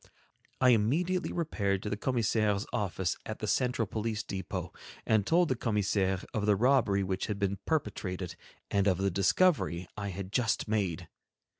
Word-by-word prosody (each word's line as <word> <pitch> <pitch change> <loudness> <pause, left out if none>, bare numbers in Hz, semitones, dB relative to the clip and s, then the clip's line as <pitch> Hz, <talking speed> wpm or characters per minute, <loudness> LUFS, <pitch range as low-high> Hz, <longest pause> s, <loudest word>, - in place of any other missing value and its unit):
I 130 - +5
immediately 155 - +2
repaired 100 - -1
to 105 - -3
the - - 0
commissaire's 110 -3 +1
office 95 -6 -1
at - - -5
the - - -4
central 125 -2 +1
police 110 +1 -3
depot, 95 -2 -5 0.3
and 110 -3 +2
told 175 +1 +4
the 130 - 0
commissaire 100 -4 0
of 105 -1 -1
the 105 - +5
robbery 115 -4 +3
which 95 0 -2
had 105 -3 -2
been 100 -1 -1
perpetrated 95 - -2 0.4
and 100 0 +2
of 95 -3 +3
the 95 +1 0
discovery 95 - +2
I 100 -1 -4
had 95 0 -6
just 115 -2 +1
made. 100 -7 -1
105 Hz, 160 wpm, -30 LUFS, 95-120 Hz, 0.4 s, I